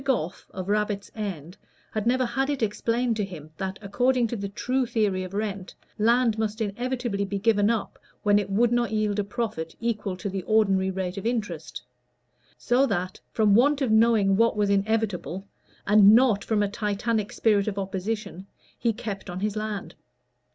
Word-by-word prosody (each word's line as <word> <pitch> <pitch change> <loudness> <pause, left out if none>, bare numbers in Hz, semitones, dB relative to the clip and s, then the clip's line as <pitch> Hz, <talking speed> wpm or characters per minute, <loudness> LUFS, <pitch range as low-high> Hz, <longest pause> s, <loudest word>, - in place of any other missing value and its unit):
Goffe, 235 - -2
of 185 -1 -6
Rabbit's 205 -1 -1
End, 185 -6 -6 0.3
had 215 0 -2
never 255 +1 +3
had 265 +4 -1
it 280 -5 -1
explained 230 +3 0
to 210 - 0
him 160 -6 -8
that, 190 0 -4
according 245 +5 +2
to 235 - -3
the 200 -2 -4
true 255 +5 -1
theory 205 -5 0
of 185 +1 -7
rent, 200 -3 -4 0.2
land 230 0 +3
must 220 0 -2
inevitably 235 0 -2
be 200 0 -3
given 205 0 +3
up 230 -3 -2 0.2
when 205 0 +4
it 200 -1 -4
would 225 +4 +2
not 240 -1 +1
yield 215 -1 0
a - - +1
profit 200 -7 -4
equal 215 -5 -2
to 185 - -5
the 195 -1 -3
ordinary 195 -2 +2
rate 190 0 -3
of 195 - -3
interest; 175 - -3 0.7
so 255 +3 +2
that 185 -4 -2
from 215 -2 +3
want 280 +6 +4
of 265 -6 0
knowing 220 -3 +4
what 230 +1 +3
was 205 -1 +2
inevitable, 200 -2 -1 0.4
and 210 0 +7
not 235 -5 +4
from 215 -2 +1
a - - +1
Titanic 210 +1 -1
spirit 210 -3 +2
of 205 -2 -2
opposition, 195 0 -4 0.3
he 235 - +2
kept 205 -3 -6
on 180 +1 -5
his 210 0 -1
land. 215 -1 -4
210 Hz, 180 wpm, -26 LUFS, 195-230 Hz, 0.7 s, and